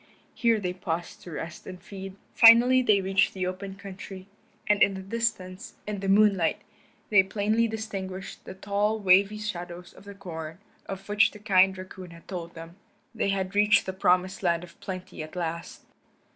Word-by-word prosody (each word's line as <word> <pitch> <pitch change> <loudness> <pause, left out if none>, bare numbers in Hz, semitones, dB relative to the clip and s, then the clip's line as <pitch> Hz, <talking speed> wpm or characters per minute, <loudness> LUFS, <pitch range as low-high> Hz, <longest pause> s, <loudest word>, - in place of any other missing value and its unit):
Here 230 -3 +2
they 180 -3 -2
paused 175 -2 -5
to 175 - -10
rest 165 +1 -7
and 185 -1 -8
feed. 195 0 -9 0.2
Finally 240 +3 +7
they 210 -5 +3
reached 195 +1 +1
the 185 -1 -2
open 190 +1 -5
country, 195 -1 -9 0.4
and 210 -3 +2
in 195 0 +5
the 190 - -7
distance, 195 -2 -3
in 210 -1 -4
the 195 0 -3
moonlight, 195 -4 +3 0.5
they 205 -2 +7
plainly 210 +4 0
distinguished 195 -4 -6
the - - -9
tall 205 +3 0
wavy 200 +1 +4
shadows 175 -4 -6
of - - -16
the 200 0 -10
corn 165 -4 -7 0.3
of 195 0 -7
which 205 0 +4
the - - -13
kind 190 -2 +3
raccoon 185 -1 -9
had 170 0 -15
told 170 -2 -6
them. 165 +2 -10 0.4
They 220 -3 -1
had 190 -1 -1
reached 210 +1 +4
the 190 - -4
promised 185 0 +1
land 170 -2 +1
of 170 -1 -14
plenty 185 -3 -7
at 155 +2 -9
last. 170 -1 -5
190 Hz, 175 wpm, -27 LUFS, 180-205 Hz, 0.5 s, Finally